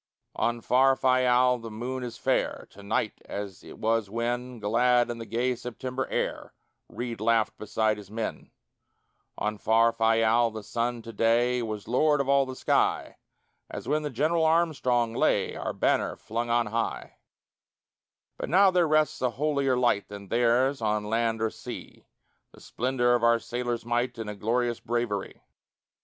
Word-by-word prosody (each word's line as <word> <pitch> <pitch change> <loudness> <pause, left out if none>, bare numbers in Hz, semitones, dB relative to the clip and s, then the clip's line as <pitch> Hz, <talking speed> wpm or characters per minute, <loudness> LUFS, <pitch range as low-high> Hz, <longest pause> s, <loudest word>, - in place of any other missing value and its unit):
On 120 0 -1
far 135 +3 +4
Fayal 125 -1 +3
the 115 - -7
moon 125 +4 -5
is 120 -2 -6
fair - - -1
To 100 - -14
night 100 - -2
as 100 -2 -6
it - - -12
was 110 -2 0
when, 120 +3 -3
Glad 120 +3 +2
in 115 - -6
the 115 - -7
gay 120 +4 0
September 125 +2 -5
air, - - -3 0.4
Reid 120 -3 -5
laughed 110 -1 +2
beside 110 0 0
his 100 -2 -11
men; 110 +1 -5 0.9
On 105 0 -2
far 115 +1 +4
Fayal 115 +1 +3
the 110 -1 -7
sun 120 +2 -2
to 115 0 -9
day 120 +3 +2
Was 110 -3 -5
lord 145 +5 +3
of 140 - 0
all 140 -1 +3
the 130 - -6
sky - - 0 0.5
As - - -7
when 150 +2 +1
the 150 - -3
General 155 +6 +1
Armstrong 145 -8 +2
lay, - - +1
Our - - -3
banner - - 0
flung 115 +2 -4
on 120 0 +2
high; 115 +2 -3 1.2
But - - -5
now 190 +3 +5
there 180 -2 +3
rests 155 0 +2
a 130 - +2
holier 140 0 0
light 120 -5 +1
Than 100 -1 -10
theirs 120 +3 +2
on 105 -1 0
land 115 +1 0
or 110 - 0
sea: - - -10 0.5
The - - -16
splendor 120 0 0
of 120 -1 +1
our 115 0 +5
sailors' 120 0 -4
might, 120 +1 -1
And 105 -2 -6
glorious 120 +1 0
bravery. 120 -4 -3
120 Hz, 160 wpm, -27 LUFS, 115-125 Hz, 1.2 s, now